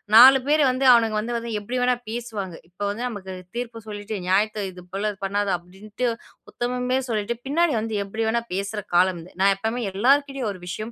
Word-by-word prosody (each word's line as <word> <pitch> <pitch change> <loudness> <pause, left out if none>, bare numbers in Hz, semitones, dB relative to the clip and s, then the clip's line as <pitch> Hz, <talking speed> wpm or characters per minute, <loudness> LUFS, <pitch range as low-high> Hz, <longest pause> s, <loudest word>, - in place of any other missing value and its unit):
4 260 +3 +10
பேர் 300 +1 +4
வந்து 255 +1 0
அவனுங்க 225 -3 +4
வந்து 235 +3 -3
வந்து 235 0 -5
எப்படி 240 +5 -4
வேணா 250 0 +3
பேசுவாங்க. 220 -7 -5
இப்ப 180 +3 -18
வந்து 205 +4 -4
நமக்குத் 190 -5 -7
தீர்ப்பு 235 -1 -4
சொல்லிட்டு 210 +1 -5
நியாயத்தை 210 +3 +2
இது 180 -1 -11
போலப் 205 +1 -2
பண்ணாத 200 +1 0
அப்படின்டு 200 +7 -5 0.4
உத்தமமே 250 +1 -1
சொல்லிட்டு 220 0 -1
பின்னாடி 315 +3 +2
வந்து 220 0 -3
எப்படி 220 +3 -3
வேணா 235 +1 +1
பேசுற 200 +2 -2
காலம் 180 0 +4
இது. 180 - -15
நான் 195 0 +5
எப்பவுமே 225 +5 -2
எல்லார்கிட்டயும் 270 +3 +2
ஒரு 185 -3 -10
விஷயம் 215 +5 -5
215 Hz, 180 wpm, -24 LUFS, 195-245 Hz, 0.4 s, 4